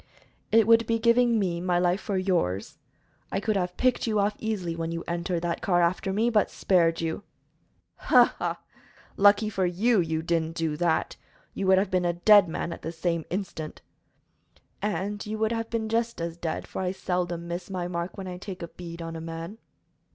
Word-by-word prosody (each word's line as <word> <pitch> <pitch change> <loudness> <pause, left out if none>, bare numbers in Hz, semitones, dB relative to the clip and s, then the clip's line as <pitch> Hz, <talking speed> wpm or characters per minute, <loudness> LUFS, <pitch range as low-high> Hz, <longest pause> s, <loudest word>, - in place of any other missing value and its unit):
"It 225 -1 +6
would 230 0 +5
be 230 - +2
giving 235 +1 +4
me 175 -4 -1
my 180 -1 +1
life 180 +2 +1
for 200 -3 -2
yours. 175 - -1 0.5
I 195 - 0
could 215 +1 -1
have 180 -2 -2
picked 255 -1 +1
you 215 -1 +1
off 205 +1 +1
easily 195 -7 -2
when 165 0 -3
you 165 0 -4
entered 170 0 -2
that 170 -1 -2
car 175 -3 +2
after 180 +3 0
me, 220 +5 +1
but 210 -3 +3
spared 165 -3 +2
you." 165 +2 -2 0.8
"Ha! - - +5
ha! - - -2 0.6
Lucky 205 +2 +5
for 195 -3 -1
you 210 +6 +2
you 160 -2 -1
didn't 165 -1 0
do 160 -2 -1
that; 165 0 0 0.4
you 195 - -2
would 190 0 +6
have 190 0 +1
been 180 -1 +1
a 175 - +1
dead 200 +2 +6
man 170 +1 -3
the 165 - -4
same 170 -1 -2
instant." 175 -5 -5 1.0
"And 205 +1 -2
you 215 +1 -4
would 220 +1 +1
have 225 -1 -2
been 225 -1 -2
just 230 0 -1
as 165 0 -3
dead, 165 -2 -4
for - - -5
I 185 0 -1
seldom 175 -2 -2
miss 175 +2 -5
my 180 -2 -3
mark 175 0 -4
when 190 -1 -6
I 180 -1 -6
take 190 -2 -7
a 170 - -6
bead 170 -1 -8
on 165 0 -6
a 160 - -6
man." 165 +6 -7
180 Hz, 200 wpm, -27 LUFS, 170-210 Hz, 1.0 s, It